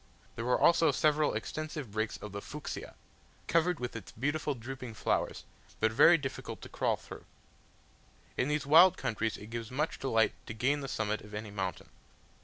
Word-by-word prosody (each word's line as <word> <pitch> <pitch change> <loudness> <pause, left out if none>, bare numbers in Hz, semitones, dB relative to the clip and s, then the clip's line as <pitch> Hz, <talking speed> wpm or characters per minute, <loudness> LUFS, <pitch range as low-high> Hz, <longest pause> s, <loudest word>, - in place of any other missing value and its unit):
There 115 - -4
were 125 - +2
also 165 -2 +5
several 150 +2 +2
extensive 155 -6 -4
brakes 110 +1 -2
of 105 - -8
the 100 +1 -5
Fuchsia, 150 +6 -7 0.5
covered 170 0 +2
with 125 -1 -4
its 110 -4 -7
beautiful 145 +4 -1
drooping 125 -1 -7
flowers, - - -1 0.4
but 110 - +3
very 150 +9 +7
difficult 135 -3 -5
to - - -9
crawl - - +1
through. - - -11 1.1
In 125 - +1
these 150 0 0
wild 165 +5 +7
countries 110 0 -1
it 105 +2 -11
gives 115 -1 -4
much 150 +5 -2
delight 115 -5 +2
to 115 - -6
gain 135 +6 +1
the 135 - -5
summit 110 -4 -1
of 105 0 -10
any 105 0 -5
mountain. 95 -2 -4
125 Hz, 175 wpm, -31 LUFS, 110-150 Hz, 1.1 s, very